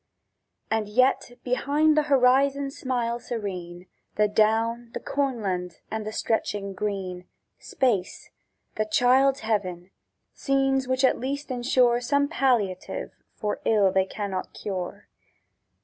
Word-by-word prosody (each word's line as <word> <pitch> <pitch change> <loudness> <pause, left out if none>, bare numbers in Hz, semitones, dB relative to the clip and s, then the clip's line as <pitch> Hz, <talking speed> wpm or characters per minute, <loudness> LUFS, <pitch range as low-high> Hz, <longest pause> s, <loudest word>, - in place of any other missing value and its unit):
And 220 -2 0
yet 255 +2 +2
behind 290 +5 +2
the 305 - +5
horizon 275 +1 +3
smile 240 -3 -2
serene 180 -7 -6 0.3
The 210 0 +3
down, 225 +3 +1
the - - -2
cornland, 200 -11 -2 0.2
and 220 -1 -3
the - - -3
stretching 205 -3 -2
green— 190 -3 -4 0.3
Space—the 215 -1 -3
child's 260 +5 +3
heaven: 190 -5 -2 0.4
scenes 270 -1 +1
which 260 +1 0
at - - +2
least 280 +2 -4
ensure 245 -1 +2
Some 285 +3 +1
palliative 240 - 0 0.2
for 210 -1 -3
ill 205 -4 +3
they 190 0 +2
cannot 195 -1 -5
cure. 195 0 -5
230 Hz, 115 wpm, -26 LUFS, 200-265 Hz, 0.4 s, the